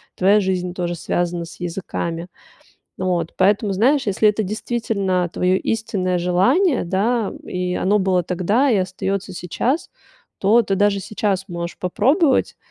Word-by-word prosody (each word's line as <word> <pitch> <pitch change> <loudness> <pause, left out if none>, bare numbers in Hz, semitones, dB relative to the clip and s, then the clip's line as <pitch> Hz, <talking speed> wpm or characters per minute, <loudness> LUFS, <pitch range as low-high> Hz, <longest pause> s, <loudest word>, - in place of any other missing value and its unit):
Твоя 200 +3 +4
жизнь 180 -2 -1
тоже 175 -1 -3
связана 175 +1 -2
с 165 - -13
языками. 170 -1 -4 0.7
Вот. 175 -3 -1
Поэтому, 200 +2 +2
знаешь, 250 +8 +2
если 205 +1 +3
это 210 +1 +1
действительно 200 -4 -1
твоё 180 +1 +2
истинное 200 -4 -1
желание, 245 - +2
да, 205 +5 0
и 180 0 -3
оно 205 +4 +2
было 185 -2 +2
тогда 195 - +1
и 225 - +3
остаётся 190 +1 -2
сейчас, 205 - -2 0.5
то 220 +5 +4
ты 195 -2 -1
даже 200 0 +2
сейчас 200 -1 -2
можешь 170 -1 -5
попробовать, 265 - +2
190 Hz, 135 wpm, -20 LUFS, 180-215 Hz, 0.7 s, Твоя